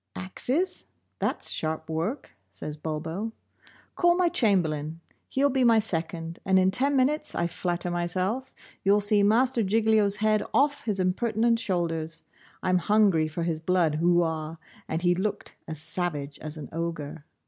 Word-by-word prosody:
'Axes? 260 Hz, -, -2 dB, 0.3 s
That's -, -, 0 dB
sharp 160 Hz, 0 st, -2 dB
work,' 170 Hz, -, -3 dB, 0.2 s
says 150 Hz, -, -5 dB
Bulbo. 160 Hz, +8 st, -4 dB, 0.6 s
'Call 345 Hz, -1 st, +4 dB
my 360 Hz, -2 st, +3 dB
Chamberlain, 165 Hz, -, +1 dB, 0.3 s
he'll 280 Hz, +1 st, +2 dB
be 260 Hz, 0 st, +2 dB
my 230 Hz, -2 st, +5 dB
second, 165 Hz, -5 st, -3 dB
and 190 Hz, 0 st, +3 dB
in 185 Hz, 0 st, +4 dB
ten 275 Hz, +7 st, +2 dB
minutes, 295 Hz, +3 st, +1 dB
I 170 Hz, -, 0 dB
flatter 175 Hz, 0 st, -2 dB
myself, 185 Hz, +8 st, -1 dB, 0.3 s
you'll 200 Hz, +2 st, +4 dB
see 205 Hz, 0 st, +3 dB
Master 235 Hz, +4 st, +3 dB
Giglio's 215 Hz, 0 st, +3 dB
head 215 Hz, 0 st, +2 dB
off 285 Hz, +1 st, +2 dB
his 210 Hz, -4 st, -1 dB
impertinent 225 Hz, +5 st, +1 dB
shoulders. 165 Hz, -5 st, -2 dB, 0.4 s
I'm 185 Hz, 0 st, +2 dB
hungry 195 Hz, -5 st, +3 dB
for 160 Hz, +2 st, -4 dB
his 165 Hz, -2 st, -1 dB
blood 165 Hz, -2 st, +1 dB
Hoooo, 175 Hz, 0 st, +4 dB
aw!' 160 Hz, -1 st, -3 dB, 0.3 s
and 160 Hz, +2 st, -3 dB
he 175 Hz, 0 st, +4 dB
looked 195 Hz, +3 st, -3 dB
as 160 Hz, -2 st, -5 dB
savage 150 Hz, -4 st, -2 dB
as 155 Hz, +1 st, -7 dB
an 150 Hz, -, -8 dB
ogre. 165 Hz, -2 st, -4 dB
185 Hz, 150 wpm, -27 LUFS, 165-220 Hz, 0.6 s, my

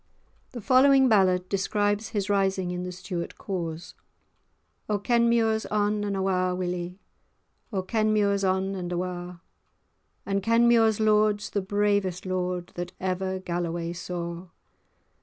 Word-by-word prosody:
The 240 Hz, -, -6 dB
following 265 Hz, +3 st, +5 dB
ballad 185 Hz, -5 st, +3 dB
describes 205 Hz, +2 st, 0 dB
his 205 Hz, -3 st, -2 dB
rising 195 Hz, -2 st, +1 dB
in 180 Hz, 0 st, -3 dB
the 180 Hz, 0 st, -5 dB
Stuart 180 Hz, -1 st, -6 dB
cause— 175 Hz, -2 st, -5 dB, 1.0 s
"O 210 Hz, -, +2 dB
Kenmure's 235 Hz, 0 st, +2 dB
on 210 Hz, 0 st, 0 dB
and 200 Hz, -1 st, -2 dB
awa', 185 Hz, -1 st, 0 dB
Willie, 180 Hz, 0 st, -4 dB, 0.7 s
O 190 Hz, -3 st, -2 dB
Kenmure's 210 Hz, -1 st, +1 dB
on 190 Hz, +1 st, 0 dB
and 180 Hz, -2 st, -5 dB
awa'; 180 Hz, 0 st, -4 dB, 0.8 s
And 200 Hz, 0 st, -1 dB
Kenmure's 230 Hz, 0 st, +4 dB
lord's 210 Hz, -1 st, +2 dB
the 200 Hz, -, 0 dB
bravest 200 Hz, -2 st, 0 dB
lord 180 Hz, -1 st, -2 dB
That 175 Hz, 0 st, -6 dB
ever 190 Hz, 0 st, -2 dB
Galloway 170 Hz, -2 st, -3 dB
saw. 175 Hz, 0 st, -5 dB
190 Hz, 120 wpm, -26 LUFS, 180-210 Hz, 1.0 s, following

